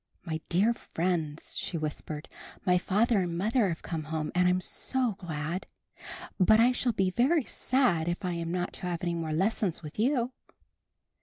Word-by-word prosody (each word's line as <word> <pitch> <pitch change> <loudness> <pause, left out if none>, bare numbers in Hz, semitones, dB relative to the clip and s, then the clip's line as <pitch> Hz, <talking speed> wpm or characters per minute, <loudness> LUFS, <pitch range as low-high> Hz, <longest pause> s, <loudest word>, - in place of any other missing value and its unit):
"My 160 -2 -3
dear 200 +7 +3
friends," 165 -7 -2
she 170 - -3
whispered. 155 0 -5 0.4
''My 180 -1 +3
father 210 +2 +2
and 170 -2 -2
mother 215 +2 +2
have 165 - -4
come 160 -3 -4
home, 155 -1 -3
and 180 0 +3
I'm 180 0 +3
so 250 +6 +2
glad! 165 +1 -4 0.7
But 215 +4 +6
I 240 +2 +6
shall 250 -1 0
be 190 -4 +1
very 260 - +2
sad 245 -12 +1
if 175 +3 -2
I 180 - -1
am 170 -1 -3
not 180 0 -2
to 180 - -6
have 175 -1 -3
any 175 -1 0
more 165 -2 -3
lessons 185 +1 0
with 150 +5 -9
you." 250 +1 +2
180 Hz, 175 wpm, -29 LUFS, 165-220 Hz, 0.7 s, But